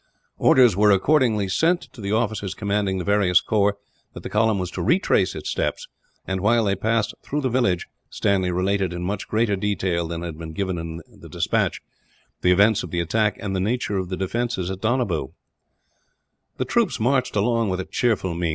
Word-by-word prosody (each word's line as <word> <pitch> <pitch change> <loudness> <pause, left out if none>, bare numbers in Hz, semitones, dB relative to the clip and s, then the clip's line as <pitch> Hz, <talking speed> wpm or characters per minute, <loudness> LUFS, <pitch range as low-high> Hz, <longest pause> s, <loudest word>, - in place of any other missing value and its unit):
Orders 125 -7 +5
were 105 +2 +4
accordingly 110 0 +3
sent, 165 - +2
to 115 - -11
the 100 0 -3
officers 110 -3 -1
commanding 100 -2 -1
the 90 - -3
various 100 -2 +3
corps, 100 -1 +1 0.4
that - - -9
the - - -6
column 110 0 +2
was 90 -2 -3
to - - -4
retrace 185 +4 +2
its - - -4
steps - - -2 0.4
and, 95 -1 -2
while 115 +3 +3
they 100 -2 +1
passed 110 +2 0
through 150 +1 -3
the 130 -3 -1
village, 100 -9 +1 0.2
Stanley 95 -2 0
related, 95 0 0
in 90 0 -5
much 95 +2 -3
greater 110 -1 +1
detail 95 -4 -1
than 85 0 -5
had 80 -2 -6
been 80 -1 -7
given 95 0 -2
in 80 0 -6
the - - -15
despatch, - - -1 0.6
the 90 - +4
events 100 +3 +4
of - - -7
the 85 - -2
attack, 105 +4 0
and 95 -2 -3
the - - 0
nature 105 0 -1
of 90 -1 -4
the 95 - -3
defences 95 -1 -2
at 95 0 -6
Donabew. 100 - -1 1.2
The - - -1
troops - - 0
marched 125 +1 +1
along 115 +1 +1
with 90 0 -2
a 95 - -3
cheerful 110 -7 0
mien. 85 0 -1
100 Hz, 195 wpm, -23 LUFS, 90-115 Hz, 1.2 s, Orders